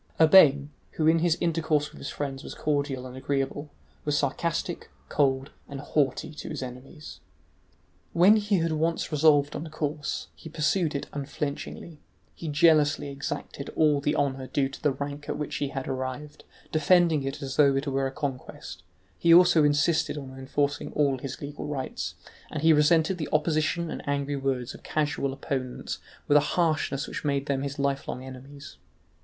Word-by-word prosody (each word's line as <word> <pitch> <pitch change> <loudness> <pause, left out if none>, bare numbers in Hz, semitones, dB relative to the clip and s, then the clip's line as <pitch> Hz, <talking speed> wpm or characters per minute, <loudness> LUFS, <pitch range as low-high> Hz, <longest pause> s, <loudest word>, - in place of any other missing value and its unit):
Urbain, 150 -4 +7 0.2
who 155 - -1
in 165 +1 +5
his 170 0 +2
intercourse 160 -3 0
with - - -13
his 140 - -5
friends 135 -2 -4
was - - -8
cordial 140 -3 -1
and 125 0 -9
agreeable, 140 +2 -2 0.3
was 150 -1 0
sarcastic, 165 +5 -2 0.2
cold, 135 -2 +1 0.2
and 140 -1 -6
haughty 145 +1 -1
to 150 - -8
his 150 -4 -4
enemies. 130 +5 -10 0.9
When 190 +6 +6
he 205 -1 +1
had 165 -1 0
once 165 +2 -1
resolved 145 -1 +4
on 160 - -5
a - - -9
course, 150 -1 -3
he 160 - -11
pursued 155 +1 0
it 140 - -2
unflinchingly; 145 +2 -5 0.3
he 165 - -8
jealously 150 -1 +3
exacted 140 0 -5
all 150 -2 +3
the 145 +2 0
honour 135 -3 -1
due 135 -1 0
to 135 - -11
the 150 - +3
rank 145 +1 -6
at - - -2
which 150 -1 -3
he 145 - -1
had 135 -1 -5
arrived, 130 +3 -5 0.3
defending 160 0 +4
it 135 +2 -4
as 135 -1 -4
though 140 -2 +5
it 135 +2 -1
were 135 -1 0
a - - -5
conquest; 135 -2 -6 0.4
he 170 - +4
also 170 -2 +7
insisted 145 +2 +2
on 135 -2 -8
enforcing 140 +2 -2
all 140 -3 +1
his 135 0 -6
legal 145 +1 -6
rights, 140 -3 -4 0.3
and 150 - -4
he 160 0 +7
resented 160 +4 +3
the 155 - -3
opposition 155 +2 +1
and - - -5
angry 140 0 -1
words 135 -2 -2
of - - -12
casual 150 -3 -1
opponents 130 -2 -4 0.3
with 145 - +6
a 150 - +1
harshness 155 -4 +1
which - - -6
made 140 -2 0
them 140 -2 -1
his 140 0 -4
lifelong 140 -2 -2
enemies. 135 +2 -11
145 Hz, 170 wpm, -27 LUFS, 135-155 Hz, 0.9 s, Urbain